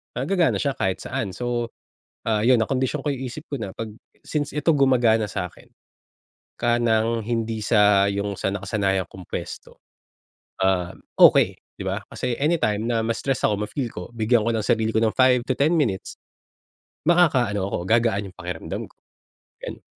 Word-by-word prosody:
ah, 125 - -2
gagana 175 +1 +2
siya 140 - 0
kahit 95 -1 -1
saan. 95 -5 -3
So, 120 -1 -2 0.5
ah, 110 0 0
yun 125 -3 +5
nakondisyon 130 +3 -1
ko 145 - -1
yung 130 -1 -3
isip 150 +5 -8
ko 140 - -3
na 100 -4 -6
'pag 115 -1 -5 0.3
since 145 -2 -3
ito 150 +2 +2
gumagana 120 -6 +3
sa 90 -3 -4
akin - - -19 0.9
ka 120 0 +3
ng 115 -1 +1
hindi 115 -2 -2
sa 105 -2 +5
yung 100 -1 -2
sa 95 - -1
nakasanayan 95 -2 -1
kong 95 -2 -11
puwesto, - - -7 0.8
ah, 90 -2 +1 0.3
okey, - - +7 0.2
'di - - -6
ba? - - -2
Kasi 125 -1 -3
anytime 145 -10 +1
na 115 -1 +1
ma-stress 130 +3 -1
ako, 105 0 +1
ma-feel 125 0 -3
ko, 90 - -7
bigyan 115 +1 +3
ko 115 - +3
ng 110 - -1
sarili 110 -2 +2
ko - - +4
ng 110 - +2
5-10 130 +4 +3
minutes, 110 -11 -1 0.9
makakaano 130 - +3
ako, - - -1
gagaan 115 -3 +2
yung - - -32
pakiramdam 90 -2 -5
ko, - - -32 0.7
ganun. - - -7
115 Hz, 165 wpm, -23 LUFS, 105-130 Hz, 0.9 s, okey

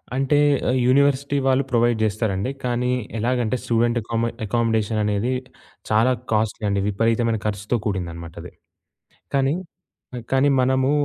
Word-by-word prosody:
అంటే 135 +2 +2 0.3
ఆహ్, 130 +1 +2
యూనివర్సిటీ 140 +1 +2
వాళ్ళు 135 +1 +3
ప్రొవైడ్ 120 -1 +2
జేస్తారండి. 110 +1 -1
కానీ 125 0 0 0.3
ఎలాగంటే, 120 0 0
స్టూడెంట్ 120 +1 +1
అకాం 115 +1 -2 0.2
అకమోడేషన్ 110 0 0
అనేది 105 +4 0 0.6
చాలా 110 +4 +3 0.2
కాస్ట్‌లీ 110 0 0
అండి. 100 0 0
విపరీతమైన 115 +2 +1
ఖర్చుతో 105 +2 -1
కూడిందన్నమాటది. 85 -5 -5 0.8
కానీ, 135 +1 +2 0.8
కానీ 135 +2 +4
మనము 130 +1 +2
115 Hz, 115 wpm, -22 LUFS, 105-130 Hz, 0.8 s, కానీ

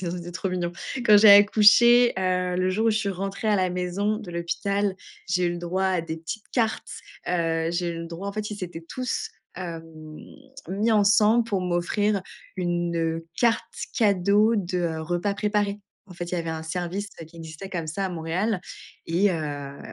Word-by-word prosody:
ça 175 -2 -3
c'était 175 0 -6
trop 185 +2 -3
mignon. 175 -1 -2 0.3
Quand 210 - +8
j'ai 210 0 +8
accouché, 225 +4 +7
heu, 180 -1 0
le 185 +1 +1
jour 215 +4 0
où - - +5
je 215 - +1
suis 210 -2 -2
rentrée 195 +3 -4
à 210 - +4
la 185 -1 +1
maison 180 +4 -1
de 200 -6 -9
l'hôpital, 195 +3 -1 0.3
j'ai 180 0 +1
eu 175 - 0
le 175 - -5
droit 175 +2 -2
à 185 -2 +1
des 160 -1 -5
petites 165 +6 -7
cartes, 225 -3 0 0.4
heu. 165 -2 0
J'ai 175 0 -1
eu 165 - -5
le 165 - -6
droit 170 +4 -7
en - - -4
fait, 210 +1 -4
ils 210 - -5
s'étaient 175 -4 -7
tous 255 - -3 0.3
hem, 170 -3 -6 0.8
mis 205 +5 0
ensemble 215 +2 +4
pour 205 -5 -1
m'offrir 185 +3 0 0.3
une, 175 -1 -1
heu, 165 0 -2
carte 235 -2 +3 0.3
cadeau 210 0 +3
de, 180 -2 -1
heu, 165 -2 -1
repas 175 +5 -1
préparés. 205 -1 0 0.3
En 185 - -13
fait, 175 - -5
il - - +1
y - - 0
avait 165 -1 -3
un 160 0 -4
service 180 +5 -3 0.2
qui 170 - -17
existait 160 +3 -8
comme 170 -4 -3
ça 175 +6 -3
à - - -3
Montréal 180 +4 -2 0.5
et 185 +5 +2
heu, 145 -4 -4
185 Hz, 195 wpm, -25 LUFS, 170-205 Hz, 0.8 s, Quand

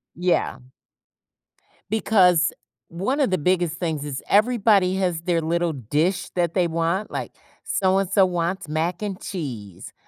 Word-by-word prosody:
Yeah. 175 -5 0 1.3
Because 180 -6 +3 0.4
one 195 - -2
of 275 -7 +3
the 185 - +2
biggest 175 0 0
things 160 -5 -2
is 135 -2 -5
everybody 205 -4 +3
has 180 -4 -1
their 170 -1 0
little 170 +1 0
dish 150 - -1
that 170 -2 0
they 180 -2 +2
want, 170 +4 -1
like, - - -4 0.3
so-and-so 190 0 +2
wants 175 0 -2
mac 165 +4 -2
and 200 -3 -4
cheese, 120 - -7
175 Hz, 130 wpm, -23 LUFS, 165-190 Hz, 1.3 s, Because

